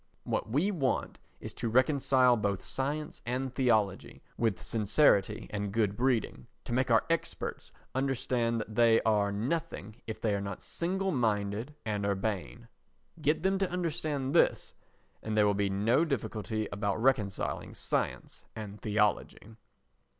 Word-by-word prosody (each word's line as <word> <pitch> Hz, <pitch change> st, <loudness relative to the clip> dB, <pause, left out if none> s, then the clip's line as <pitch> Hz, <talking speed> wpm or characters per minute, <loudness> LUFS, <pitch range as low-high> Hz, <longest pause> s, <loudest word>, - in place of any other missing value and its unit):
What -, -, -2 dB
we 150 Hz, -, +1 dB
want 140 Hz, -9 st, -1 dB, 0.2 s
is -, -, -7 dB
to 115 Hz, -, -3 dB
reconcile 130 Hz, 0 st, +4 dB
both 100 Hz, -3 st, -1 dB
science 150 Hz, +3 st, -3 dB
and 130 Hz, +1 st, -2 dB
theology 110 Hz, -7 st, 0 dB
with 115 Hz, -5 st, 0 dB
sincerity 105 Hz, -1 st, +2 dB
and 105 Hz, -1 st, -3 dB
good 105 Hz, -2 st, +1 dB
breeding, 120 Hz, -, 0 dB, 0.2 s
to -, -, -5 dB
make 130 Hz, +1 st, +1 dB
our 115 Hz, -2 st, +4 dB
experts 165 Hz, 0 st, -3 dB, 0.2 s
understand 125 Hz, -3 st, 0 dB
that 110 Hz, -, -7 dB
they 115 Hz, 0 st, +5 dB
are 105 Hz, -2 st, +2 dB
nothing 115 Hz, -1 st, -3 dB
if 110 Hz, -1 st, -5 dB
they 110 Hz, -2 st, 0 dB
are 100 Hz, -, -1 dB
not 100 Hz, -2 st, -6 dB
single 190 Hz, +3 st, -1 dB
minded 110 Hz, -, -1 dB
and 105 Hz, -2 st, -2 dB
urbane. 100 Hz, +3 st, -2 dB, 0.5 s
Get 155 Hz, +2 st, +1 dB
them 190 Hz, 0 st, +2 dB
to 195 Hz, -2 st, 0 dB
understand 155 Hz, -6 st, -2 dB
this, -, -, +3 dB, 0.5 s
and 110 Hz, 0 st, -3 dB
there 105 Hz, -, +5 dB
will 105 Hz, -, +3 dB
be 100 Hz, 0 st, 0 dB
no 110 Hz, +10 st, +2 dB
difficulty 110 Hz, -, -2 dB
about 100 Hz, 0 st, -1 dB
reconciling 110 Hz, -6 st, 0 dB
science -, -, -2 dB
and 105 Hz, -2 st, -7 dB
theology. 105 Hz, +1 st, 0 dB
115 Hz, 145 wpm, -30 LUFS, 105-135 Hz, 0.5 s, they